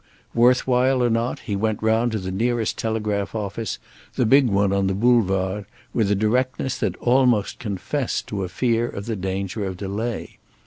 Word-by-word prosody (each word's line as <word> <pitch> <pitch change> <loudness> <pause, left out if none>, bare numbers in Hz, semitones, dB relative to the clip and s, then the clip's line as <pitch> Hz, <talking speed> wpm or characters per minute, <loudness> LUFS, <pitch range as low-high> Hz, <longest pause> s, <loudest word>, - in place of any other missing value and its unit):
Worth 125 +2 +4
while 130 0 +3
or 120 - +2
not, 115 +2 -1
he 105 -4 -3
went 110 +1 -1
round 110 +2 +2
to - - 0
the 95 -2 -4
nearest 115 +3 0
telegraph 105 -2 -2
office, 105 0 -3 0.4
the 125 - +2
big 135 +3 +5
one 100 -2 +2
on 100 0 +1
the 95 - 0
Boulevard, 100 -3 +2 0.3
with 110 -4 +1
a 105 - +3
directness 125 +5 0
that - - -1
almost 125 -4 +2
confessed 115 +6 -2
to 100 -2 -3
a 90 - -4
fear 120 +4 0
of 100 - -6
the 115 - -2
danger 95 +2 -3
of 95 -2 -4
delay. 105 +5 -4
110 Hz, 180 wpm, -23 LUFS, 100-120 Hz, 0.4 s, big